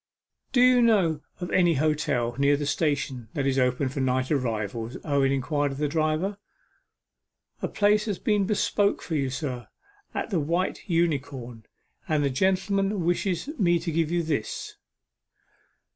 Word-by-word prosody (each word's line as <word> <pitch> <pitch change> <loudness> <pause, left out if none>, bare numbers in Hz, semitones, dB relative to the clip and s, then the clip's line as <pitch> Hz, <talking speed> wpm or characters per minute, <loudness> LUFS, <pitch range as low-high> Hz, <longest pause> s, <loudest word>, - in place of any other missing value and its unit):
'Do 245 - +3
you 250 0 +6
know 190 -10 +3 0.2
of 175 -1 -5
any 175 -3 +4
hotel 150 -5 0
near 140 +1 +4
the 145 - -3
station 140 -6 -1
that 140 -3 -1
is 135 -1 +1
open 125 +2 +1
for 135 +2 -4
night 130 0 0
arrivals?' 115 -3 -2
Owen 140 -3 +2
inquired 145 +1 0
of 135 - -6
the 150 +1 0
driver. 155 +6 -1 1.2
'A - - 0
place 210 +1 +2
has 205 -4 -2
been 210 0 +1
bespoke 205 0 +1
for 165 - -5
you, 140 -4 0
sir, 130 -3 -4 0.5
at - - -3
the 180 - +2
White 170 +7 -2
Unicorn 140 - -1 0.4
and 155 -2 +2
the 140 - +1
gentleman 190 +4 +1
wished 175 +4 0
me 175 -4 +4
to 165 0 -3
give 160 -1 +1
you 170 0 0
this. 145 -9 -3
155 Hz, 155 wpm, -26 LUFS, 135-180 Hz, 1.2 s, you